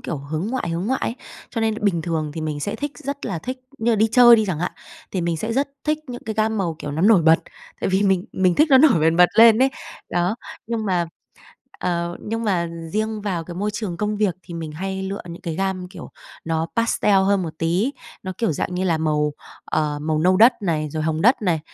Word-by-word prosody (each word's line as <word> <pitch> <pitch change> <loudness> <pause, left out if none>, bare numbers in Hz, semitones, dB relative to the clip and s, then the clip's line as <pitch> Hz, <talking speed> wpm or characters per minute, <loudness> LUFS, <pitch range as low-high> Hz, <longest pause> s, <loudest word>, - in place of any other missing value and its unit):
kiểu, 160 - -4
hướng 155 +6 -4
ngoại 250 -7 -2
hướng 170 +4 -2
ngoại 265 +3 0
ấy, 230 - -2 0.4
cho 230 - -3
nên 220 -1 +1
bình 170 -5 +1
thường 160 -3 -2
thì 160 - -4
mình 150 -2 -3
sẽ - - -3
thích, 290 0 -4
rất 280 -2 -5
là 185 -6 -3
thích 255 +8 -6 0.2
như 235 +1 +1
là 225 - +3
đi 220 +2 +4
chơi 240 -2 +8
đi 220 - +2
chẳng 175 -5 -2
hạn, 175 - -2 0.4
thì 185 - -2
mình 170 -1 -1
sẽ 220 +7 -3
rất 275 +3 0 0.2
thích 305 0 +1
những 245 -1 -7
cái 220 - -3
gam 220 0 0
màu, 170 -5 -1
kiểu, 145 - -5
nó 160 +4 -2
nổi 205 -4 +6
bật 160 +1 +6 0.4
tại - - 0
vì 190 +2 +2
mình 190 -2 +2
mình 185 -2 +2
thích 310 +1 +4
nó 265 - +8
nổi 270 - +5
bần 160 +1 +3
bật 180 0 +7
lên 225 -1 +8
ấy. 270 - +4 0.4
Đó, 175 +4 +1 0.3
nhưng 225 -2 -2
mà, 175 -3 +1 0.7
ờ, 170 0 -2
nhưng 225 +1 -2
mà 180 -5 0 0.2
riêng 215 0 -2
vào 180 -5 -2
cái 175 +1 -9
môi 205 +3 -1
trường 205 -6 -4
công 210 +2 -1
việc 205 -5 +1
thì 175 - -10
mình 160 -2 -5
hay 190 +4 -4
lựa 195 +1 -4
những 170 - -9
cái 165 -2 -4
gam, 190 0 -2
kiểu, 180 -2 -10 0.4
nó 165 0 -1
pastel 230 -3 +2
hơn 190 0 +3
một 160 - -5
tí, 180 - 0 0.3
nó, 185 - -4
kiểu 225 -8 +1
dạng 180 +4 -3
như 185 - -1
là, 170 -4 +1
màu, 150 -1 0 0.3
ờ, 150 -1 -1
màu 155 0 0
nâu 185 +3 +3
đất 235 +4 +7
này, 155 -5 -1
rồi 155 +1 -3
hồng 160 0 -1
đất 235 +2 +4
này. 170 -5 +1
185 Hz, 245 wpm, -22 LUFS, 165-220 Hz, 0.7 s, chơi